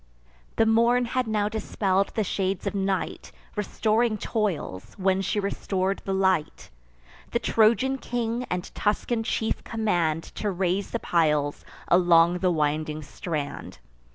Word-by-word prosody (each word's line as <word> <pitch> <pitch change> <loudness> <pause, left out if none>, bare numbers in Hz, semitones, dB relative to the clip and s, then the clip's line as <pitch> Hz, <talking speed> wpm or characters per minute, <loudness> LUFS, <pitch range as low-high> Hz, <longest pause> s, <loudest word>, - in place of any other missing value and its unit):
The 225 - +4
morn 235 +2 +4
had 250 0 -1
now 210 -2 +1
dispell'd 200 -2 0
the 220 - +1
shades 190 -1 -2
of 200 - -1
night, 195 -1 -2 0.2
Restoring 215 +2 +1
toils, 185 - -3
when 190 0 +2
she 200 +2 -1
restor'd 195 -1 -1
the 195 - -2
light. 190 -4 0 0.6
The - - +3
Trojan 235 +4 +3
king 240 0 -2
and 180 0 -4
Tuscan 225 +2 0
chief 220 0 -1
command 175 -8 0
To 210 - -4
raise 190 +1 -1
the - - -1
piles 150 -7 +1 0.2
along 175 0 +5
the 185 0 +2
winding 155 -1 -1
strand. 150 -1 -5
195 Hz, 130 wpm, -26 LUFS, 175-220 Hz, 0.6 s, along